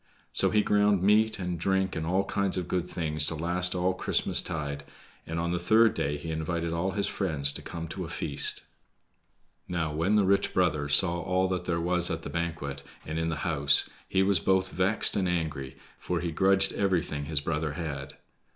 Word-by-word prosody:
So - - +4
he 105 -1 +2
ground 105 -2 +2
meat 110 +2 +3
and 90 -3 -4
drink 95 +1 0
and 80 0 -3
all 95 +3 +1
kinds 100 -2 -1
of 90 -2 -3
good 90 -1 -1
things 75 -4 -2
to 85 - -2
last 90 +3 -1
all 90 +1 +1
Christmastide, 75 -5 -1 0.4
and 80 +1 -3
on 85 0 -1
the 90 - -1
third 110 +5 +4
day 75 +1 -2
he 80 +2 -6
invited 80 +1 -2
all 90 +3 -1
his 100 0 0
friends 75 -8 0
to - - -7
come 85 -1 -6
to 95 - -5
a - - -6
feast. 75 -3 0 1.0
Now, 80 -3 -2
when 85 +7 +1
the 105 -2 +4
rich 100 +1 +1
brother 80 -6 +1
saw 85 +3 +5
all 95 +2 +1
that 90 -1 -2
there 85 -1 -1
was 90 +1 +2
at 80 0 -4
the - - -6
banquet, 80 -5 -4 0.2
and 80 +1 -3
in 80 0 -1
the 80 - -2
house, 70 -4 +4 0.2
he 95 0 +2
was 95 -2 +3
both 95 +2 +1
vexed 95 +4 +1
and 95 -3 0
angry, 75 -6 -3 0.2
for - - -2
he 85 -1 -3
grudged 95 +3 +2
everything 90 -7 -1
his 75 0 0
brother 75 0 -2
had. 75 -5 -6
85 Hz, 195 wpm, -28 LUFS, 80-95 Hz, 1.0 s, saw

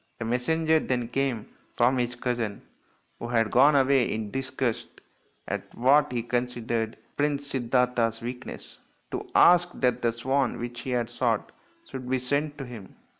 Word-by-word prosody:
A 115 - -3
messenger 160 +7 +2
then 125 -5 -2
came 125 -4 -1 0.3
from 125 +2 +3
his 120 0 -1
cousin, 120 -4 -3 0.6
who 115 - -5
had 115 -2 +1
gone 140 +4 +6
away 135 -2 +3
in 110 -1 -3
disgust 130 -3 -2 0.6
at - - -5
what 140 +4 +4
he 120 -2 -1
considered 120 -2 -2 0.2
Prince 145 -1 0
Siddartha's 125 -2 +1
weakness, 125 +2 -8 0.3
to - - -5
ask 175 0 +6
that 125 -2 +1
the 115 - +2
swan 130 +3 0
which 120 0 -6
he 130 - -6
had 120 -2 0
shot 120 -2 0 0.4
should 130 -1 -7
be 130 - +2
sent 145 +4 -1
to 135 - -5
him. 115 -6 -10
125 Hz, 155 wpm, -27 LUFS, 120-135 Hz, 0.6 s, gone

